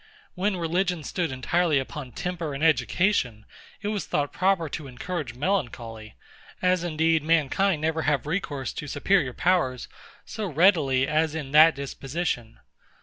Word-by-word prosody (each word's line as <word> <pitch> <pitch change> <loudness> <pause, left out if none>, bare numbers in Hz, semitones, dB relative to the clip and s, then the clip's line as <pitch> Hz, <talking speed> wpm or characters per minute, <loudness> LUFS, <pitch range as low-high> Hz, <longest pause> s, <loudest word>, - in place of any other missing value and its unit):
When 190 +1 -1
religion 175 0 -1
stood 170 0 -2
entirely 155 +5 +1
upon 135 -1 -5
temper 170 -5 -4
and 140 - -4
education, 130 - +1 0.4
it 205 - -1
was 210 -2 -3
thought 145 -1 -1
proper 185 -3 +1
to 150 -1 -6
encourage 135 0 -5
melancholy; 120 - -3 0.4
as 180 -1 +2
indeed 160 -1 +2
mankind 165 +2 +1
never 160 0 0
have 145 -2 0
recourse 145 -5 -3
to 150 - -6
superior 155 -4 +1
powers 170 -9 +1 0.4
so 215 -2 -4
readily 150 -6 +3
as 155 0 +1
in 145 -4 -5
that 155 +1 +7
disposition. 135 -3 -4
155 Hz, 140 wpm, -26 LUFS, 135-180 Hz, 0.4 s, that